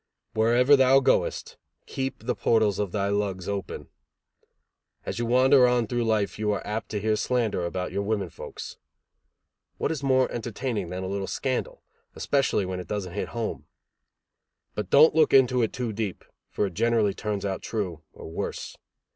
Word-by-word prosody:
Wherever 120 +5 +5
thou 135 0 +5
goest, 135 - 0 0.3
keep 135 -4 -4
the 125 - +1
portals 110 -5 +2
of 100 -3 -1
thy 100 0 -1
lugs 100 -3 -2
open; 100 -2 -4 1.2
as - - -4
you 120 - -1
wander 130 +1 +5
on 125 -1 +2
through 120 +2 -1
life 110 -2 0
you 105 -1 +1
are 100 - -4
apt 105 +2 -4
to 105 - -2
hear 110 +1 +1
slander 115 -5 0
about 90 +1 -4
your 100 - -1
women 100 -4 -2
folks. - - -9 1.0
What - - -1
is 155 -4 -3
more 130 -2 +3
entertaining 115 -4 -3
than 90 +1 -4
a - - -3
little 100 0 -3
scandal, 130 +5 -3 0.3
especially 135 -8 +1
when 90 0 -4
it 90 - -8
doesn't 95 -3 -4
hit - - -3
home? 115 -2 -4 1.1
But 105 -3 -4
don't 150 +3 +7
look 155 -3 +4
into 125 -2 +5
it 110 - +1
too 120 -3 -3
deep, 105 -3 -4 0.2
for - - -1
it 95 - -5
generally 110 0 +2
turns 105 -1 -3
out 95 -1 -2
true, 95 -8 -4
or - - -11
worse. 80 - -5
110 Hz, 170 wpm, -26 LUFS, 100-125 Hz, 1.2 s, don't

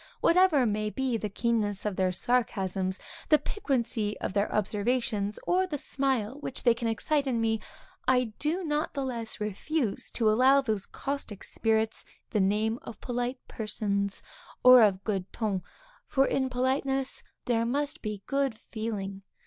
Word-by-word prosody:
Whatever 335 -7 +5
may 215 -1 0
be 260 +1 -1
the 215 -2 -2
keenness 210 -2 0
of 210 -2 -1
their 185 0 +2
sarcasms, 190 -3 0 0.3
the 305 - +7
piquancy 245 - -1
of - - -3
their 200 0 +1
observations, 210 0 0
or 370 +1 +2
the 300 -5 -3
smile 265 -3 -1
which 270 - -4
they 240 - +6
excite 235 +5 0
in 245 -3 +1
me, 225 -1 +1 0.5
I 250 -3 +3
do 330 +5 0
not 300 -1 -1
the 275 - -1
less 235 -4 -3
refuse 215 +4 -2
to 225 - +2
allow 260 +5 +5
to 255 -5 -1
those 200 -2 -2
caustic 275 -8 -4
spirits 220 0 0 0.3
the 215 - +1
name 215 +4 +1
of - - -9
polite 245 +1 -2
persons, 200 -2 -2 0.4
or 255 -1 +10
of 195 -3 +3
good 195 -3 -2
ton; 205 -5 -1 0.5
for, 270 -1 +3
in 265 -1 0
politeness 265 +1 0 0.2
there 230 -2 +2
must 285 +5 -1
be 210 -2 -5
good 275 -4 0
feeling. 210 -4 -5
230 Hz, 155 wpm, -29 LUFS, 210-265 Hz, 0.5 s, or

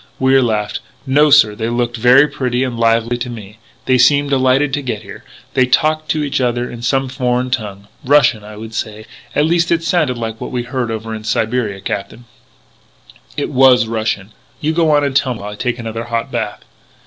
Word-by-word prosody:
Wier 130 0 +4
laughed: 105 -3 -1 0.3
"No, 145 +3 +4
sir, 110 -7 +6
they 110 +2 -3
looked 120 0 -1
very 125 +5 +5
pretty 125 -3 -2
and 125 -2 -3
lively 115 +1 +1
to 125 - -4
me. 110 -2 -10 0.3
They 130 -1 +3
seemed 140 +3 +4
delighted 135 +1 +2
to 145 - 0
get 115 -5 -4
here. 100 +1 -11 0.3
They 130 -1 +3
talked 155 +4 +1
to 155 -1 0
each 140 -2 -1
other 120 0 0
in 120 - -9
some 135 +2 0
foreign 125 -1 -1
tongue 105 -4 -4 0.2
Russian, 125 -6 +3
I 105 0 -10
should 110 +1 -9
say 110 -1 -5 0.3
at 150 - +3
least, 170 +1 +1
it 165 -1 +1
sounded 155 -6 +1
like 115 -1 -5
what - - -4
we 125 -1 -3
heard 125 -1 -3
over 110 0 -5
in 110 -1 -6
Siberia, 110 -3 -1
Captain 100 +5 -5 0.6
" - - -35 0.3
"It - - -2
was 130 -2 +5
Russian.... 110 -2 -3 0.3
You 155 +1 -1
go 165 -1 +2
on 145 -1 +3
and 140 -2 -1
tell 130 -3 +1
me 110 - -10
while 105 +1 -6
I - - -8
take 125 +2 -2
another 115 -1 -5
hot 115 0 -3
bath! - - -4
125 Hz, 205 wpm, -17 LUFS, 110-135 Hz, 0.6 s, sir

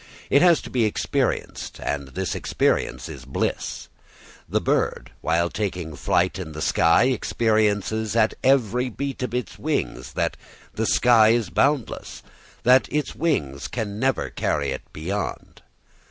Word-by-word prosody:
It 140 - +6
has 175 -3 +5
to - - -9
be 125 -3 +2
experienced, 105 - -2
and 70 -1 -3
this 95 +6 -3
experience - - 0
is 65 - -9
bliss. 65 - -3 0.6
The - - +1
bird, - - 0
while 85 +1 +1
taking 90 -6 -3
its 70 - -12
flight 90 +2 +1
in 80 -4 -6
the 75 - -6
sky, 85 +6 +4
experiences 110 -3 +1
at 110 -1 +3
every 125 -2 +3
beat 135 +3 -4
of 125 -1 -2
its 125 -8 -4
wings - - -2
that - - -1 0.4
the 110 0 -1
sky 115 -3 +5
is 115 -5 +1
boundless, 140 -4 0 0.4
that 125 +2 +5
its 150 0 -1
wings 75 - -1
can 105 -3 -4
never 135 +2 0
carry 70 -2 -1
it - - -4
beyond. 95 +7 -5
110 Hz, 145 wpm, -24 LUFS, 85-125 Hz, 0.6 s, It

